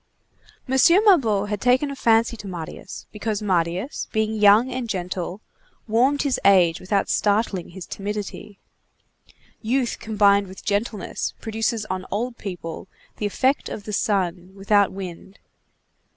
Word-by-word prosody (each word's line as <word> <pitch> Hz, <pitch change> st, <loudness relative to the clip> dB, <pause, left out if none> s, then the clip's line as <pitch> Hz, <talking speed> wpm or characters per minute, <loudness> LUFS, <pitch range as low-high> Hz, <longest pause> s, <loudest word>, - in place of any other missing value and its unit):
M. 265 Hz, +1 st, +1 dB, 0.3 s
Mabeuf 225 Hz, -, +4 dB
had 210 Hz, -2 st, -3 dB
taken 255 Hz, +3 st, +2 dB
a -, -, -5 dB
fancy 230 Hz, -2 st, +3 dB
to 210 Hz, -, -9 dB
Marius, 175 Hz, -4 st, -8 dB
because 210 Hz, -1 st, -3 dB
Marius, 180 Hz, -, -1 dB
being 220 Hz, 0 st, 0 dB
young 210 Hz, +3 st, +5 dB
and 250 Hz, -2 st, -4 dB
gentle, 180 Hz, 0 st, -4 dB, 0.5 s
warmed 255 Hz, +6 st, +2 dB
his 275 Hz, -3 st, 0 dB
age 180 Hz, -4 st, +5 dB
without 195 Hz, +1 st, 0 dB
startling 205 Hz, -3 st, 0 dB
his 180 Hz, 0 st, -9 dB
timidity. 205 Hz, 0 st, -6 dB, 1.0 s
Youth 245 Hz, +2 st, 0 dB
combined 200 Hz, -2 st, +3 dB
with 190 Hz, 0 st, -12 dB
gentleness 205 Hz, 0 st, -2 dB
produces 225 Hz, 0 st, -2 dB
on 185 Hz, -2 st, -4 dB
old 235 Hz, +4 st, -3 dB
people 180 Hz, -3 st, -6 dB, 0.3 s
the 210 Hz, -, -1 dB
effect 260 Hz, +7 st, 0 dB
of 205 Hz, -, -6 dB
the 210 Hz, -, -6 dB
sun 185 Hz, -3 st, -1 dB
without 200 Hz, 0 st, +2 dB
wind. 190 Hz, 0 st, -8 dB
205 Hz, 135 wpm, -23 LUFS, 190-230 Hz, 1.0 s, young